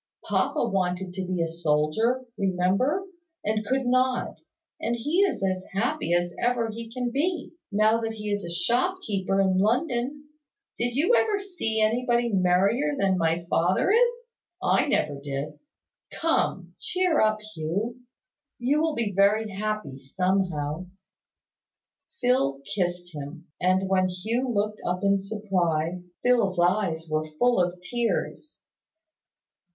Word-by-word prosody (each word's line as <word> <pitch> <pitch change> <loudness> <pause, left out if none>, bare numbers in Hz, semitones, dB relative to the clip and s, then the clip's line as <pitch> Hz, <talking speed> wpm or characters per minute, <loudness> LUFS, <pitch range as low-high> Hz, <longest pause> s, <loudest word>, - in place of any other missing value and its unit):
Papa - - +1
wanted 185 -2 -1
to 185 -1 -4
be 180 -2 0
a - - -1
soldier, 165 +10 +1
remember, 195 - +1 0.4
and 215 0 0
could 260 +4 0
not; 255 0 +1 0.4
and 235 +2 -1
he 295 +10 0
is 390 - +2
as 185 -1 0
happy 235 - -1
as 175 0 +1
ever 240 -2 +1
he 230 +1 -8
can 245 0 -2
be, 330 +7 -1 0.2
now 215 +2 +3
that 225 0 -2
he 210 -1 -5
is 205 0 -1
a 170 - -5
shop 240 - +1
keeper 195 -1 0
in 190 -1 +3
London. 255 - 0 0.5
Did 240 +1 -1
you 330 - +3
ever 430 -4 +3
see 355 - -3
anybody 235 +2 +2
merrier 195 +10 +2
than 195 -5 +2
my 165 +1 +1
father 180 - +2
is? 480 +2 +4 0.4
I - - +2
never 145 -2 0
did. 140 +1 -5 0.5
Come! 190 - 0
Cheer 365 -3 +1
up, 215 0 +3 0.2
Hugh! 200 +10 -3 0.6
You 275 +5 +1
will 320 -1 +1
be 225 -3 -1
very 210 +2 +3
happy 210 -8 -3
somehow." 180 0 -1 1.3
Phil 140 - +2
kissed 175 -2 -2
him: 150 +3 -8
and 185 +1 +2
when 185 -1 +2
Hugh 225 +8 -2
looked 210 -1 -1
up 180 +2 -2
in 200 0 +3
surprise, 180 -4 -1
Phil's 230 -7 +3
eyes 175 -2 +1
were 155 0 -1
full 245 -3 +3
of 180 0 -1
tears. 240 +9 -3
205 Hz, 135 wpm, -26 LUFS, 180-245 Hz, 1.3 s, is